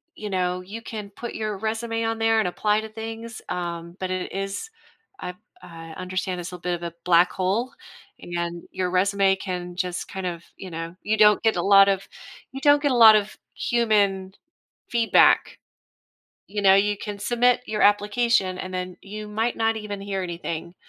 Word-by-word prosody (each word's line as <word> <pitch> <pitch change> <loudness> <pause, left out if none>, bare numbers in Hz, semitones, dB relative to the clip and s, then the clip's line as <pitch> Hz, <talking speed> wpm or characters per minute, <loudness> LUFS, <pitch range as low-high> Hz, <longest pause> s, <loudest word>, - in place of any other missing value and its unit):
you 210 -1 -6
know, 180 -1 -1
you 210 +5 -8
can 210 -3 -7
put 240 +4 -7
your 215 -2 -3
resume 225 +2 -2
on 225 0 -1
there 225 0 +3
and 210 - +1
apply 210 +4 +1
to 220 - -8
things, 225 +1 -7
um, 170 -1 -4
but 185 -1 -3
it 185 0 -3
is 195 - -4 0.5
I 180 - -5 0.3
I 165 -1 -10
understand 185 0 -3
it's 175 +1 -6
a 180 - -7
bit 175 0 -1
of 170 - -9
a 170 -1 -5
black 175 0 +5
hole, 200 +7 -1 0.5
and 170 0 -4
your 180 -1 -2
resume 195 +1 +3
can 180 -2 -5
just 180 -1 -3
kind 190 -2 -5
of, 170 -1 -5
you 190 - -8
know 165 +1 -6
you 215 +1 0
don't 210 -1 +6
get 220 -3 +3
a 175 - 0
lot 195 0 +7
of 195 0 -1 0.4
you 270 0 -7
don't 290 0 +5
get 285 - +2
a - - +2
lot 215 - +9
of 210 0 0 0.2
human 200 -5 +1 0.6
feedback, 230 -1 +4 0.9
you 205 +1 -3
know? 195 -1 +6
You 205 +1 +2
can 205 -1 -6
submit 245 +3 +2
your 215 -1 -2
application, 205 -2 +2
and 185 0 -6
then 180 -1 -4
you 210 +1 -8
might 225 +3 -1
not 225 0 +1
even 205 -2 -6
hear 195 -1 -3
anything. 170 0 -5
195 Hz, 185 wpm, -24 LUFS, 180-220 Hz, 0.9 s, lot